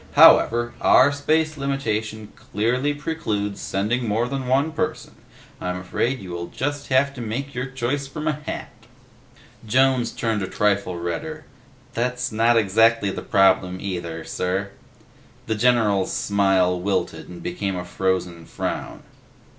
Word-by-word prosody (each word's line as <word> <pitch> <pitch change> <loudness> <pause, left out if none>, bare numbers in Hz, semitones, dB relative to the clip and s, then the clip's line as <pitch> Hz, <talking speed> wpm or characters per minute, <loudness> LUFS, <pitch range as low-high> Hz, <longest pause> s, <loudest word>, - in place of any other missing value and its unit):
However, 120 0 +6
our 135 +3 +6
space 155 +2 0
limitation 110 -6 -3
clearly 125 +7 -1
precludes 145 -10 -3
sending 115 +5 -1
more 110 +3 +1
than 135 0 -4
one 140 +5 +2
person. 160 - -3 0.5
I'm 90 0 -2
afraid 115 +8 -1
you 95 -5 -9
will 85 0 -4
just 145 +1 -3
have 140 +1 +2
to 125 - -8
make 130 +5 -4
your 125 +1 -3
choice 135 +2 -2
from 150 +3 -5
a 155 - +2
hat." 150 0 -6 1.0
Jones 130 0 +3
turned 110 -3 -1
a 95 - -2
trifle 100 -2 0
redder. 155 - -4 0.5
"That's 125 +1 -1
not 115 +2 +3
exactly 110 0 +3
the - - -5
problem, 95 -2 +3
either, 85 -4 -4
sir." 95 +4 -2 0.7
The 110 - -1
general's 110 -4 +2
smile 95 -3 +2
wilted 95 +1 -2
and 90 -1 -10
became 95 +2 -3
a 90 0 -4
frozen 90 -3 -2
frown. - - -4
115 Hz, 140 wpm, -23 LUFS, 95-135 Hz, 1.0 s, However